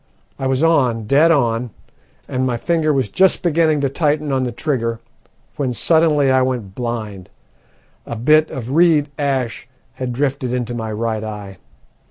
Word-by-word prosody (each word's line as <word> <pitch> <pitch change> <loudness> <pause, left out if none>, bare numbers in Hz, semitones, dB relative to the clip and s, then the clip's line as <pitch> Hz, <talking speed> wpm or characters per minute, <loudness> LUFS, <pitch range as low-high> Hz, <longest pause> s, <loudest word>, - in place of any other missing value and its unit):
I 135 - -1
was 130 +3 0
on, 125 -9 +2
dead 145 +8 +4
on, 120 -6 +1 0.6
and 130 0 -2
my 125 -2 0
finger 160 +3 0
was 135 -5 0
just 190 - +2
beginning 160 -3 +2
to 140 - +2
tighten 150 0 0
on 130 -1 0
the 125 - -3
trigger, 115 -3 -2 0.6
when 130 -4 -2
suddenly 155 -2 +3
I 130 0 +4
went 125 -7 -2
blind 110 -5 -5 0.8
a 120 - -4
bit 155 +7 +3
of 125 -1 -6
reed 155 -2 +3
ash 130 -4 -2 0.3
had 130 -1 -4
drifted 130 -1 -2
into 120 -1 -3
my 110 -2 -4
right 110 0 -2
eye. 105 -3 -7
130 Hz, 160 wpm, -19 LUFS, 115-150 Hz, 0.8 s, dead